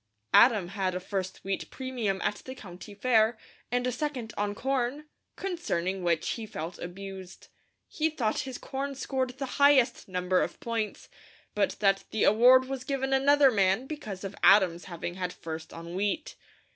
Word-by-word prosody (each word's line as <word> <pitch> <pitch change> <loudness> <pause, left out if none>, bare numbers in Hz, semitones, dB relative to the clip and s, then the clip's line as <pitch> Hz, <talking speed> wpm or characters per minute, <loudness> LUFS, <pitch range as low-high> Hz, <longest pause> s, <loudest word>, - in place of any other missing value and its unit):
Adam 215 -8 +6
had 190 -2 -2
a - - -1
first 190 0 -4
wheat 195 0 -3
premium 245 -7 -2
at 205 - 0
the 260 - -7
County 195 -3 -11
Fair 220 0 +3 0.3
and 245 0 +1
a 250 - +1
second 250 -4 -4
on 205 0 -1
corn, 265 +3 -1 0.3
concerning 195 - -2
which 170 -2 +1
he 225 -2 -4
felt 165 -2 -6
abused. 190 +1 -9 0.4
He 315 +1 0
thought 235 -9 -1
his 260 -2 -4
corn 275 +1 -4
scored 260 -1 -2
the 275 - -3 0.2
highest 270 -4 +5
number 180 0 +1
of - - -3
points, 230 -2 -3 0.5
but 205 - +1
that 195 -1 +3
the 220 - 0
award 250 +5 +6
was 265 -1 -4
given 270 0 -1
another 275 0 +5
man 195 +2 +2
because 215 -11 -7
of 195 0 -6
Adam's 185 -4 +5
having 175 -1 -5
had 180 -1 -2
first 160 -2 -7
on 165 +1 -8
wheat. 205 - -2
215 Hz, 165 wpm, -28 LUFS, 190-260 Hz, 0.5 s, Adam